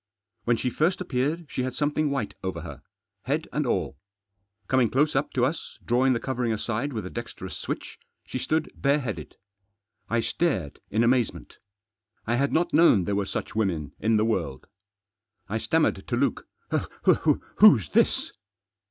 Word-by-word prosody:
When 120 -1 +3
she 125 - -1
first 165 +8 +1
appeared 155 0 -1
she - - -2
had 130 0 -3
something 150 +1 +1
white 135 -7 -2
over 95 0 -3
her, - - -9 0.4
head - - -1
and - - 0
all. 70 - -1 0.7
Coming 130 -3 +3
close 150 +3 +2
up 135 +2 0
to 125 -2 +3
us, 155 +5 -4
drawing 130 +2 +3
the 120 - 0
covering 125 -3 -1
aside 115 +5 -2
with 110 -6 -4
a - - -5
dexterous 120 0 -6
switch, - - -5 0.3
she 130 - -4
stood 155 +3 -1
bareheaded. 125 - -1 0.7
I 115 0 +2
stared 105 - -1
in 110 +3 +2
amazement. 120 0 0 0.7
I 120 +1 +1
had 140 +2 +1
not 175 +2 +1
known 140 - +6
there 100 - -1
were 100 -1 0
such - - -4
women 85 - -1
in 110 +1 +2
the 105 - +2
world. 80 - -2 0.8
I - - -2
stammered - - +1
to - - 0
Luke— - - 0 1.1
"Who's 130 - +7
this?" - - +2
125 Hz, 160 wpm, -26 LUFS, 110-140 Hz, 1.1 s, Who's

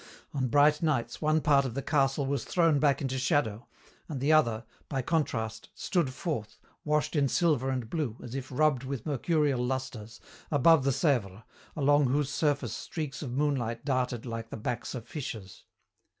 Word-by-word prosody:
On 130 -2 0
bright 145 +3 +4
nights 135 -7 -1
one 155 0 +2
part 140 -2 +4
of 125 -3 -4
the 140 - -2
castle 140 -1 +1
was 140 0 -1
thrown 165 -5 +2
back 145 -1 +2
into 130 -1 -1
shadow, 125 -5 0 0.4
and 145 -4 -4
the 145 +4 +3
other, 115 -7 +3 0.2
by 135 -3 -1
contrast, 120 -8 -2
stood 170 -8 0
forth, 130 - -4 0.3
washed 150 +2 0
in 145 -2 +3
silver 140 -3 +2
and 130 -3 -2
blue, 130 -5 -3
as 120 - -8
if 135 0 -5
rubbed 135 -1 +2
with 130 -3 -5
mercurial 145 -2 +1
lusters, 125 -4 -4 0.3
above 150 0 +5
the - - +3
Sèvre, 120 - 0 0.3
along 145 -1 +4
whose 140 +2 0
surface 145 -8 0
streaks 150 -5 -5
of 130 -5 -5
moonlight 130 -4 -1
darted 125 -4 -1
like 115 -1 -5
the - - -6
backs 120 +4 -4
of 120 -1 -7
fishes. 110 - -7
135 Hz, 170 wpm, -29 LUFS, 120-150 Hz, 0.4 s, above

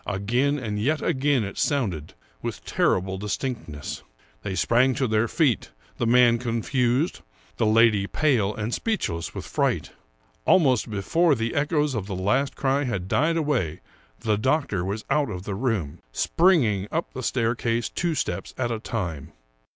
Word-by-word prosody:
Again 120 +9 +1
and 105 -6 -3
yet 150 +8 0
again 140 -5 +2
it 100 - -6
sounded, 95 - -1 0.3
with - - -5
terrible 95 +1 +1
distinctness. 100 - -4 0.4
They 95 - -4
sprang 120 +7 +3
to 130 -2 0
their 110 +1 +2
feet, 135 - +1 0.3
the 120 - 0
man 120 0 +5
confused, 125 +5 0 0.4
the 110 - +2
lady 110 -2 +4
pale 125 -10 +1
and 110 +2 -3
speechless 130 - -2
with - - -5
fright. - - -1 0.5
Almost 130 - +3
before 150 - +2
the 115 0 -2
echoes 150 0 +1
of 105 -5 -3
the 100 - -4
last 105 +9 0
cry 135 +1 +1
had 100 -7 -3
died 165 +11 +2
away 135 - 0 0.4
the 105 -2 0
doctor 130 - 0
was 100 +4 -4
out 145 -2 +2
of 90 -3 -5
the 100 - -4
room, 95 - -2
springing 120 - +2
up 165 +2 -2
the 130 - -5
staircase 115 -1 0
two 170 -3 -2
steps - - -3
at 120 -2 -1
a 115 - -2
time. 85 - -4
115 Hz, 155 wpm, -25 LUFS, 100-140 Hz, 0.5 s, man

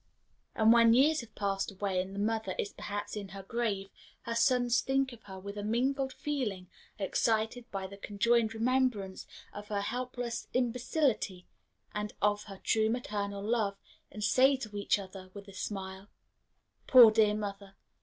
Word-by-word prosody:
And 220 +1 +6
when 230 -1 +6
years 300 +4 +4
have 230 -2 -14
passed 195 0 -1
away, 190 -1 -1
and 190 +1 -7
the - - -4
mother 220 -2 -1
is 200 - -3
perhaps 205 +1 -5
in 205 -2 -5
her 195 0 -9
grave, 200 -3 -2 0.3
her 235 - -4
sons 245 0 +3
think 270 -1 0
of 230 - -13
her 190 -2 -9
with 200 +2 -7
a - - -4
mingled 265 +5 0
feeling 230 -12 -3 0.3
excited 220 +4 0
by 195 -1 -4
the 200 +1 -9
conjoined 225 +3 +1
remembrance 230 -5 0 0.3
of 205 0 -8
her 205 -1 -1
helpless 245 +1 -4
imbecility 250 - 0 0.5
and 210 0 -3
of 205 0 +1
her 195 -2 -9
true 220 -1 +2
maternal 205 -4 -3
love, 210 -3 0 0.3
and 210 - -6
say 260 +6 +5
to 215 -5 -8
each 205 0 +1
other, 190 -1 -9
with 200 0 -9
a 195 - -12
smile, 190 0 -6 0.8
"Poor 245 -4 +9
dear 215 -1 +3
mother! 200 -2 -6
215 Hz, 165 wpm, -31 LUFS, 200-240 Hz, 0.8 s, Poor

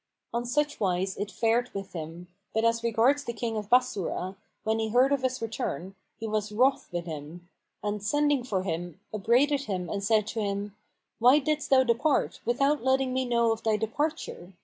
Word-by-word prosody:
On 240 +1 -1
such 295 +3 0
wise 190 -1 0
it 205 +1 -3
fared 230 +5 +1
with 195 -1 -6
him; 165 +1 -7 0.3
but 220 +1 +2
as 230 0 +2
regards 235 +5 +3
the 235 - -4
King 225 0 -3
of 210 -1 -4
Bassorah, 200 -6 +1 0.3
when 220 +1 0
he 220 - 0
heard 250 +5 +4
of 280 -2 +2
his 255 -2 -1
return, 195 -5 -3 0.3
he 225 - -4
was 215 -1 -1
wroth 260 +5 +2
with 175 -1 -3
him; 160 +2 -8 0.4
and 210 0 -2
sending 290 +4 +2
for 195 -7 -1
him, 175 -2 -4
upbraided 265 +7 +2
him 180 -3 -3
and 200 -1 -2
said 215 0 +3
to 225 - -3
him, 200 -1 -2 0.4
"Why 250 +5 +7
didst 300 +1 -1
thou 265 -1 +6
depart, 260 +5 +1
without 275 +3 +2
letting 265 0 +2
me 260 0 0
know 235 -2 +2
of 225 0 -2
thy 220 -1 +2
departure? 225 - -3
225 Hz, 190 wpm, -28 LUFS, 200-260 Hz, 0.4 s, Why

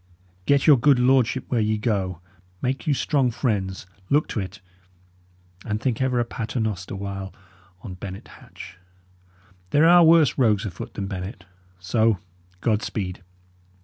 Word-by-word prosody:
Get 140 -1 +3
your 150 -4 +7
good 140 +2 +4
lordship 130 0 +2
where 120 -3 +1
ye 110 0 +1
go; 95 -6 -2 0.4
make 130 - -3
you 150 - +3
strong 135 -2 +1
friends; 100 -7 -2 0.2
look 145 +2 +2
to - - -2
it. 95 -1 -6 1.0
And 105 0 -2
think 125 0 -1
ever 130 -2 +1
a 120 - +1
pater 115 +1 -4
noster 100 -4 -3
while 95 0 -5 0.5
on 95 - -7
Bennet 95 +1 -9
Hatch. 95 - -13 0.9
There 150 - +4
are 175 0 +7
worse 160 -4 +5
rogues 110 -4 +3
afoot 95 -5 -7
than 100 - -3
Bennet. 95 0 -6 0.3
So, 110 +4 +1 0.4
God 110 -2 +1
speed!" 95 -7 -4
110 Hz, 145 wpm, -23 LUFS, 95-130 Hz, 1.0 s, your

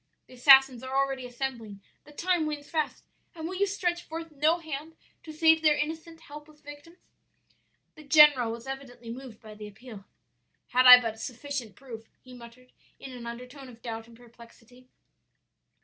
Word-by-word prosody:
The - - -18
assassins 265 -1 +6
are 260 +1 -4
already 270 -2 -1
assembling, 240 -5 -6 0.3
the 295 - -16
time 345 +1 -1
wanes 295 -1 -6
fast, 310 -2 -3 0.3
and 320 -1 -6
will 365 - -6
you 400 +2 0
stretch 355 -3 -2
forth 330 0 -8
no 305 +3 +1
hand 315 -1 -8 0.3
to 315 - -11
save 320 +1 +3
their 305 -2 +3
innocent, 320 +2 -5
helpless 300 0 -13
victims?' 290 +4 -13 1.0
"The 310 - -15
general 290 -5 +5
was 230 0 -8
evidently 255 -3 -9
moved 245 -2 -10
by 215 -1 -13
the 210 0 -10
appeal. 210 -1 -13 0.6
'Had 255 +1 +4
I 250 0 +12
but 225 -2 -5
sufficient 250 -1 -6
proof,' 230 -5 -12
he 255 - -16
muttered 245 +1 -15 0.3
in 270 - -10
an 240 -2 -9
undertone 250 +3 -10
of 230 -2 -17
doubt 225 -1 -7
and 230 -1 -17
perplexity. 235 +1 -19
265 Hz, 165 wpm, -27 LUFS, 235-305 Hz, 1.0 s, I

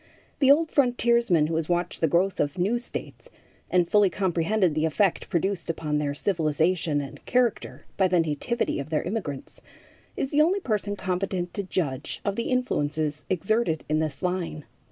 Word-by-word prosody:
The 270 - +4
old 315 +2 +3
frontiersman 235 - +3
who 160 +1 -2
has 160 0 -2
watched 175 0 -1
the 160 - +4
growth 180 +5 +1
of 145 +5 0
new 205 +7 +1
states, 250 - -8 0.4
and 180 -2 +3
fully 205 +1 +4
comprehended 185 0 +1
the 155 +1 +1
effect 190 +4 0
produced 175 0 -1
upon 155 -2 -1
their 145 -1 -2
civilization 160 -2 +1
and 140 - -9
character 245 -3 0
by 190 - +4
the 180 -1 +2
nativity 165 +10 -1
of 140 - -5
their 155 -2 0
immigrants, 175 -9 -5 0.6
is 270 - -2
the 295 - +4
only 360 +6 +3
person 210 - -2
competent 185 -2 -2
to 200 - -2
judge 155 -8 -3
of 200 -1 0
the 235 - -2
influences 155 - -1
exerted 190 -2 0
in 155 0 +1
this 155 +1 -3
line. 180 -4 -2
180 Hz, 170 wpm, -26 LUFS, 155-210 Hz, 0.6 s, The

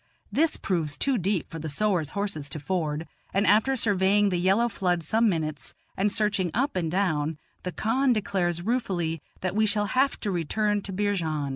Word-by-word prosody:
This 320 +1 +2
proves 160 -6 -2
too 270 -4 +1
deep 190 -2 -1
for 165 - -6
the 160 0 -4
sowars' 175 -1 0
horses 200 -8 -2
to 155 - -5
ford, 155 -1 -2 0.3
and 200 +1 +3
after 220 +7 +4
surveying 205 -2 +3
the 180 -2 0
yellow 195 +6 +3
flood 180 -6 -1
some 225 +7 +2
minutes 155 -6 -3 0.2
and 200 +2 +1
searching 200 -4 +1
up 270 +5 0
and 170 -3 0
down, 160 -4 0 0.2
the 180 - -4
khan 255 +8 +1
declares 180 -6 0
ruefully 180 - -1 0.2
that 185 +1 -2
we 215 0 +3
shall 205 0 +2
have 270 +2 +2
to 205 - -1
return 205 +5 0
to 195 - -6
Beerjand. 175 -8 -1
190 Hz, 180 wpm, -26 LUFS, 165-210 Hz, 0.3 s, after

